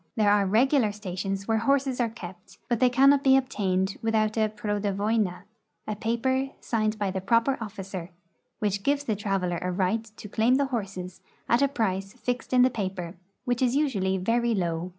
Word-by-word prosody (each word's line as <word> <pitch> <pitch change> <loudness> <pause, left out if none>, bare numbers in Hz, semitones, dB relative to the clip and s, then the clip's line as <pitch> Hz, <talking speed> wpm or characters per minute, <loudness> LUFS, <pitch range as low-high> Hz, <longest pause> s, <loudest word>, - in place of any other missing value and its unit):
There 210 -2 +3
are 205 -1 +3
regular 235 +2 +3
stations 195 -1 -4
where 225 -1 +2
horses 270 +1 +1
are 240 -2 +1
kept, 185 -5 -11
but 240 -2 0
they 255 0 +5
cannot 275 +3 +5
be 265 0 +6
obtained 195 -7 -1
without 220 -1 +1
a 220 -1 +2
prodovoina 205 -2 -1 0.2
— - - -48
a 215 - -2
paper 260 +5 0
signed 215 -2 -1
by 200 -2 -1
the 190 0 -3
proper 230 +7 +2
officer 195 -4 -6 0.3
— - - -49
which 205 -1 -1
gives 285 +5 +1
the 220 -6 -1
traveler 195 -4 -1
a 180 - -2
right 190 +4 0
to 215 -1 -12
claim 225 +5 +2
the 280 +1 +2
horses 190 -5 -4 0.3
at 235 +3 +3
a 280 - +5
price 195 -7 -2
fixed 250 -1 -4
in 250 -1 +5
the 255 - +4
paper, 185 -5 -4 0.3
which 245 -1 0
is 250 0 +2
usually 200 -11 +1
very 230 +4 +1
low. 170 -2 -2
215 Hz, 190 wpm, -26 LUFS, 195-245 Hz, 0.3 s, be